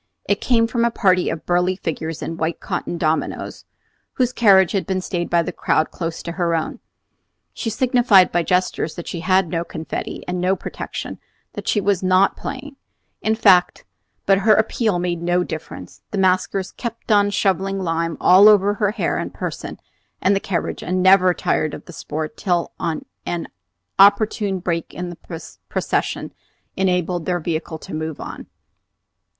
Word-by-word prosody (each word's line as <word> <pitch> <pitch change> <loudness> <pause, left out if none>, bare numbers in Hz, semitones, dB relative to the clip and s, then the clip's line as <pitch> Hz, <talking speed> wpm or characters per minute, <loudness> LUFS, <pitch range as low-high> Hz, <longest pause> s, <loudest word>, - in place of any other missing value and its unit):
It - - +1
came 230 -3 +3
from 235 0 -1
a 235 - +3
party 185 -5 +2
of 160 - -5
burly 180 +1 +1
figures 165 -3 -4
in 165 - -4
white 165 0 -2
cotton 175 - -4
dominos, 160 -1 -2 0.5
whose 250 -1 0
carriage 190 -7 +5
had 195 - -1
been 190 -1 0
stayed 175 -1 -3
by 170 -1 +3
the 180 - -4
crowd 155 -2 0
close 165 -2 -5
to 170 - -4
her 170 -1 0
own. 160 - -3 0.7
She 230 - -3
signified 235 -5 +4
by 175 - +2
gestures 180 -2 0
that 175 - -8
she 170 - -4
had 185 +1 +2
no 165 0 -1
confetti 160 -1 -6
and 180 0 -2
no 185 +2 +2
protection, - - -6 0.3
that - - -7
she 210 - +2
"was 200 -2 +1
not 185 +1 +3
playing," 285 -1 -7 0.4
in 220 0 +1
fact; 190 -5 +4 0.4
but 195 0 +4
her 215 +2 +5
appeal 220 -2 +1
made 175 -1 -2
no 175 +1 +1
difference. 95 - -8
The - - -4
maskers 190 0 +1
kept 230 -1 -6
on 205 -1 +4
shovelling 195 -1 0
lime 165 -2 -2
all 195 +4 +7
over 205 -1 +4
her 205 0 0
hair - - -1
and - - -4
person - - -6 0.4
and 195 +2 +3
the - - +1
carriage, 185 -3 -3
and 185 0 -1
never 185 -1 +6
tired 155 - 0
of - - -12
the 175 - -11
sport 155 0 -5
till 175 -3 0
an 160 -2 -2 1.0
opportune 200 0 +4
break 170 -2 -3
in 175 0 -4
the 170 -1 -9 0.2
procession - - -2 0.4
enabled 180 -2 0
their 180 -1 0
vehicle 160 0 -3
to - - -10
move 155 -1 -4
on. - - -8
185 Hz, 170 wpm, -21 LUFS, 170-200 Hz, 1.0 s, all